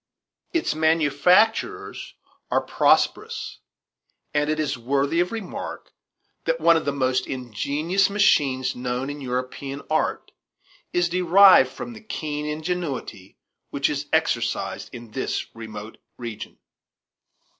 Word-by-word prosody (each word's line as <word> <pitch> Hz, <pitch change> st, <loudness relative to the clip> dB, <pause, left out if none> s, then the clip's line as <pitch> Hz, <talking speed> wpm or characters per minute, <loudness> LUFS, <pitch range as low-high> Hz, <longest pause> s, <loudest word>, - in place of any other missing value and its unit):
Its 335 Hz, -1 st, 0 dB
manufacturers 160 Hz, -, +2 dB, 0.3 s
are -, -, +2 dB
prosperous, 450 Hz, +1 st, +1 dB, 0.7 s
and 145 Hz, 0 st, +1 dB
it 155 Hz, 0 st, 0 dB
is 145 Hz, -2 st, 0 dB
worthy 140 Hz, +6 st, 0 dB
of 175 Hz, +1 st, +1 dB
remark 225 Hz, -5 st, -6 dB, 0.5 s
that -, -, 0 dB
one 170 Hz, -, +5 dB
of 160 Hz, -, 0 dB
the 140 Hz, -, +1 dB
most 130 Hz, -2 st, 0 dB
ingenious 145 Hz, -, 0 dB
machines 135 Hz, -10 st, +2 dB
known 125 Hz, +2 st, -3 dB
in 145 Hz, 0 st, -8 dB
European 130 Hz, +2 st, -4 dB
art 155 Hz, -, 0 dB, 0.6 s
is 175 Hz, 0 st, +2 dB
derived 180 Hz, -4 st, +6 dB
from 240 Hz, -, -7 dB
the 220 Hz, -, -11 dB
keen 150 Hz, -8 st, -4 dB
ingenuity 150 Hz, -, -4 dB, 0.3 s
which -, -, 0 dB
is -, -, -3 dB
exercised -, -, 0 dB
in 120 Hz, -2 st, -10 dB
this 130 Hz, -, -2 dB
remote 110 Hz, -1 st, -9 dB, 0.2 s
region. 115 Hz, -3 st, -7 dB
145 Hz, 115 wpm, -24 LUFS, 130-180 Hz, 0.7 s, derived